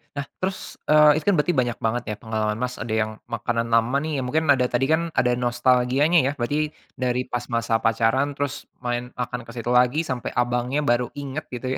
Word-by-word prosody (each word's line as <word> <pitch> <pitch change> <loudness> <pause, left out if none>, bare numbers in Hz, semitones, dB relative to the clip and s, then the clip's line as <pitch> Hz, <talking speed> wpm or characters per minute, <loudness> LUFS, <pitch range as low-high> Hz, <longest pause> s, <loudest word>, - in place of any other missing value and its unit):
Nah, 140 -1 -3
terus, 190 +1 -4
eee, 150 -1 +7
itu 155 - -3
kan 205 - +5
berarti 155 +3 +1
banyak 120 -2 0
banget 115 +2 0
ya - - -3
pengalaman, 110 -1 -1
Mas, 125 0 -2
ada 110 0 -4
yang 110 0 0 0.2
makanan 115 0 -1
lama 115 +3 +3
nih, 155 -3 -2
ya - - -1
mungkin 160 +5 0
ada 125 -2 +1
tadi 125 +2 +1
kan 160 - +3 0.2
ada 125 - +3
nostalgianya 125 +5 +3
ya - - +1
berarti 145 +5 0 0.2
dari 125 0 -1
pas 120 0 -3
masa 115 -1 +1
pacaran 115 +4 +2
terus 145 -1 -4 0.2
main 120 0 -2
makan 125 0 -3
ke - - -9
situ 120 0 -3
lagi, 125 +4 +4
sampai 130 -4 -3
abangnya 125 +4 0
baru 120 -2 +2
inget 140 +1 -4
gitu 125 +1 -5
125 Hz, 205 wpm, -23 LUFS, 120-140 Hz, 0.2 s, eee